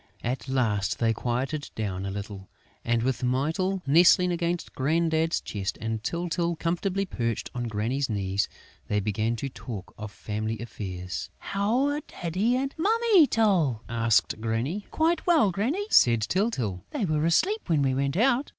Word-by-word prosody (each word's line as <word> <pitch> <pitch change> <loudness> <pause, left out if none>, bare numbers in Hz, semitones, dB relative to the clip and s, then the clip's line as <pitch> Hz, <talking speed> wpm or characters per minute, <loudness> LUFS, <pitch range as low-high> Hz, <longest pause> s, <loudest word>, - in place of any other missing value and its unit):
At 130 +3 -3
last, 105 -6 0
they 115 -1 +2
quieted 130 +6 -2
down 100 -3 -3
a - - -2
little; 100 -1 -7 0.3
and, 115 -1 +1
with 130 -1 -1
Mytyl 160 +9 0
nestling 175 +5 +5
against 170 0 -2
Grandad's 160 +3 +1
chest 100 -2 -4
and 110 -1 -3
Tyltyl 170 +5 -1
comfortably 180 +4 -1
perched 115 - -3
on 120 -1 -3
Granny's 115 +6 -1
knees, 100 -2 -1 0.4
they 105 - +1
began 110 +3 -1
to 135 - -4
talk 115 -6 -8
of 105 -1 -6
family 110 +2 -4
affairs: 95 -5 -6
"How 215 +7 0
are 290 +1 -2
Daddy 190 - -1
and 275 +1 -2
Mummy 425 -3 +5
Tyl?" 175 - +2
asked 115 -2 +1
Granny. 120 - -2
"Quite 325 +2 +1
well, 310 - +5
Granny," 260 - -1
said 115 -2 +5
Tyltyl. 115 - -1
"They 270 -9 -2
were 155 -3 0
asleep 375 - +1
when 155 -4 +3
we 135 -1 +2
went 140 +3 0
out." 260 +5 +2
135 Hz, 155 wpm, -27 LUFS, 110-190 Hz, 0.4 s, nestling